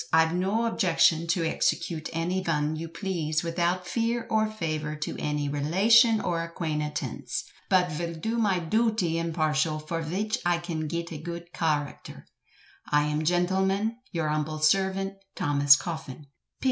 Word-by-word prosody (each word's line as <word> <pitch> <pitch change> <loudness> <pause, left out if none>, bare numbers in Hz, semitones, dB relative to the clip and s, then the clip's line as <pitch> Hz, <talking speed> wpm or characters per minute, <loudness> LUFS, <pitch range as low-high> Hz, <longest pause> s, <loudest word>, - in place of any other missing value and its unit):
Ive 160 0 +4
no 195 +6 +1
objecshun 170 -5 +3
to 170 +1 +2
exshecute 165 0 -1
any 170 +3 -1
vun 155 -3 0
yu 165 +1 -5
pleese, 165 -4 -2
without 175 +2 0
feer 230 +3 -1
or 220 0 +3
favur 155 -7 -3
too 155 - -3
any 150 -1 -1
relashun 205 - +4
or 170 -1 0
aquanetense, 150 -3 -3 0.3
but 180 -3 +3
vill 170 +2 -3
do 225 +8 -2
my 200 -4 +2
dooty 180 -2 +1
imparshul, 155 -2 0
for 165 0 -2
vich 205 +9 -2
I 175 0 +2
can 170 -3 -4
git 170 +2 -4
a 155 - -6
goood 170 +1 -7
karacter," 150 -4 -2 0.7
I 150 0 +4
am 150 +1 -1
Gentilmen, 190 +6 +1
Yure 160 -3 -1
humbel 155 +1 -1
sirvent, 190 +4 +1 0.2
THOMAS 145 0 +5
COFFIN." 155 -3 -6
170 Hz, 145 wpm, -27 LUFS, 155-190 Hz, 0.7 s, THOMAS